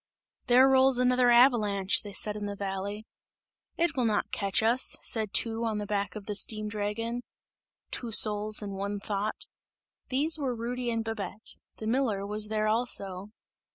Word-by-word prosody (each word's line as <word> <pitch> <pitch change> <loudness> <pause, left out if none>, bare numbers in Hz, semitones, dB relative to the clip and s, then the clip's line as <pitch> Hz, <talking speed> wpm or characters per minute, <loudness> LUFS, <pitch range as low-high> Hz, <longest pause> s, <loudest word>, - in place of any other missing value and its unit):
"There 255 +2 +6
rolls 265 -1 +4
another 250 0 +3
avalanche!" 220 -6 +4
they 205 - -9
said 210 +1 0
in 205 -1 -5
the 200 - -5
valley. 200 +2 -5 0.7
"It 335 -2 0
will 250 -3 0
not 215 -2 0
catch 200 +2 -1
us!" 235 +3 +2
said 220 -3 -1
two 230 0 0
on 220 -2 -1
the 210 - -4
back 200 -2 -3
of 210 -2 -8
the 210 - -4
steam 215 +1 +1
dragon; 220 +3 -3 0.7
"two 235 -2 -4
souls 210 0 +5
and 200 -1 -6
one 200 +1 -4
thought" 205 +1 -4 0.6
these 305 +5 +2
were 260 -4 -2
Rudy 240 +2 -4
and 230 -1 -2
Babette; 215 -2 -5 0.2
the 220 - -8
miller 220 -4 0
was 210 +1 -1
there 215 0 -1
also. 200 -4 0
215 Hz, 165 wpm, -28 LUFS, 205-240 Hz, 0.7 s, There